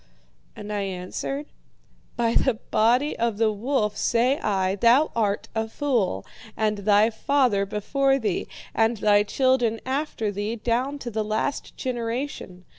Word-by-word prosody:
"And 210 0 -6
I 205 - -1
answered: 195 +9 -4 0.7
'By 235 -1 +1
the 260 -1 +2
body 240 +6 +1
of 230 -2 0
the 220 -1 +3
wolf, 210 -1 -1
say 250 +4 +2
I, 195 -1 0
thou 245 +8 +4
art 205 -3 0
a 220 0 -1
fool, 225 - -1 0.3
and 215 -1 0
thy 210 +2 +4
father 225 -4 +1
before 270 +7 +1
thee, 215 -8 -2 0.3
and 225 +1 +2
thy 205 0 +4
children 240 +1 +1
after 260 -5 -2
thee, 205 +3 -3
down 245 +5 -1
to 240 - -4
the 220 0 -1
last 215 +6 -3
generation. 235 -6 -4
225 Hz, 140 wpm, -25 LUFS, 205-255 Hz, 0.7 s, thou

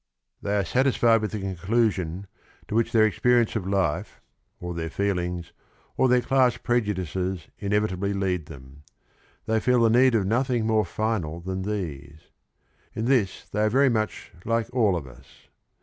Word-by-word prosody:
They 100 0 -1
are 100 - 0
satisfied 120 +1 +3
with 110 - -2
the 105 - -4
conclusion 95 -1 -1 0.4
to - - -6
which 115 +1 +1
their 110 -2 +5
ex 105 -6 -2
perience 120 -2 +3
of 100 -4 -2
life, 95 -6 -1 0.4
or 90 0 -5
their 80 -1 -4
feelings, 90 -2 -2 0.4
or 130 - +3
their 125 0 +4
class 130 0 +2
prejudices 95 -6 -2
inevitably 100 -1 0
lead 95 -5 -1
them. 70 -1 -13 0.6
They 110 0 +1
feel 125 +2 +2
the 115 - +4
need 125 +1 +5
of 105 -4 +2
nothing 120 +2 0
more 110 -1 +2
final 100 -8 -2
than 95 +2 -4
these. 80 -8 -6 0.6
In 110 - -2
this 120 -8 +1
they 105 - -2
are 110 - +3
very 135 +4 +4
much 110 -3 -2
like 115 0 -1
all 110 -7 +3
of 80 -5 -4
us. 65 0 -17
105 Hz, 165 wpm, -25 LUFS, 90-115 Hz, 0.6 s, their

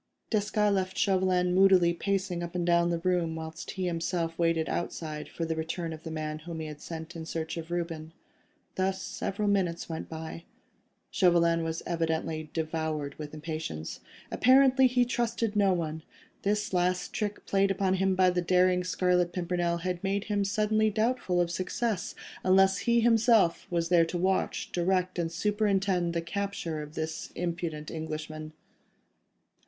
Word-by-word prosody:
Desgas 215 -1 0
had 205 - +3
left 190 -1 -1
Chauvelin 185 -2 +2
moodily 185 -2 +5
pacing 190 -1 -1
up 170 +1 -6
and 175 -1 0
down 170 0 +3
the 170 - +1
room, 170 -2 0
whilst 160 0 -7
he 190 -1 -3
himself 165 -1 -1
waited 165 -1 +2
outside 155 -3 -4
for 165 - -4
the 160 0 -2
return 165 +1 -3
of 155 - -9
the 165 - -7
man 155 -1 -4
whom 165 +1 -7
he 160 - -4
had 150 -1 -8
sent 165 +1 -7
in 165 - -5
search 160 0 -4
of 165 -1 -6
Reuben. 165 -2 -3 0.6
Thus 190 0 0
several 200 +2 -3
minutes 185 -4 0
went 160 - -5
by. 160 +1 -7 0.7
Chauvelin 170 -2 +3
was 165 0 -3
evidently 160 -2 -2
devoured 155 -3 -2
with 150 -1 -6
impatience. 155 - -5 0.3
Apparently 265 +1 +5
he 250 0 +2
trusted 230 -2 -1
no 200 -2 +4
one: 160 -3 -2 0.4
this 210 0 0
last 180 0 0
trick 205 -1 -3
played 195 0 +2
upon 195 -1 +1
him 190 0 +2
by 185 0 +4
the 180 0 0
daring 180 +1 +3
Scarlet 180 -1 +1
Pimpernel 175 -1 -1
had 180 0 -3
made 200 +1 0
him 205 -2 0
suddenly 215 +2 +2
doubtful 215 -4 0
of 175 -1 +1
success, 185 +3 -2 0.3
unless 190 +1 +4
he 235 0 +5
himself 225 -6 +4
was 170 -1 0
there 170 -2 +5
to 175 - -3
watch, 190 +2 0
direct 180 0 0
and 165 -1 -1
superintend 195 -2 +1
the 165 - 0
capture 175 -4 -3
of 150 0 -9
this 160 0 -4
impudent 170 -3 -3
Englishman. 155 -1 -5
175 Hz, 160 wpm, -29 LUFS, 165-195 Hz, 0.7 s, moodily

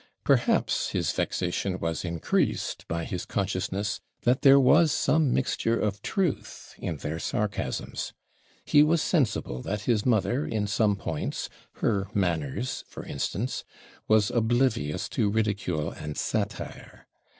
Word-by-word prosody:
Perhaps - - +2
his - - +1
vexation 90 +1 -1
was 80 -3 -2
increased 85 -2 -1
by 85 +1 -2
his 90 - -4
consciousness 100 +1 -2 0.2
that 125 +2 +3
there 140 -1 +8
was 150 +4 +5
some 155 -2 +2
mixture 115 -3 +1
of 105 -1 -1
truth 190 - -2
in 80 - -3
their 80 +3 -4
sarcasms. 105 +3 -2 0.5
He 145 - +6
was 160 +2 +4
sensible 125 - 0
that 105 +7 -3
his 105 -1 +1
mother, 125 +3 +2
in 110 -6 -1
some 105 0 +2
points 80 -6 -3 0.2
her 100 -3 0
manners, 90 - -1
for - - -9
instance 100 - -3 0.4
was 110 -2 +4
oblivious 110 - +1
to 110 -5 +1
ridicule 100 -7 0
and 75 -1 -7
satire. - - -4
105 Hz, 130 wpm, -27 LUFS, 90-125 Hz, 0.5 s, there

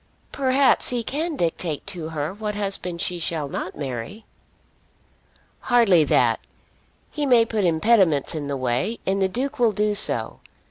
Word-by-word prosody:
"Perhaps 270 0 +2
he 245 -2 -2
can 310 +7 -2
dictate 165 - -2
to 175 -5 -5
her 155 +1 -3
what 210 0 -4
husband 195 -4 -3
she 175 -1 -2
shall 160 -3 -1
not 180 - -5
marry." 140 - -6 1.3
"Hardly 225 -10 +4
that. - - +2 0.7
He 295 -2 -2
may 240 -3 +5
put 220 -4 -1
impediments 170 - +2
in 150 -3 -4
the 140 -1 -3
way; 130 - -1
and 195 +1 0
the 190 - +2
Duke 260 +7 -3
will 235 -2 +4
do 210 +1 0
so. 205 - +1
195 Hz, 150 wpm, -23 LUFS, 160-230 Hz, 1.3 s, may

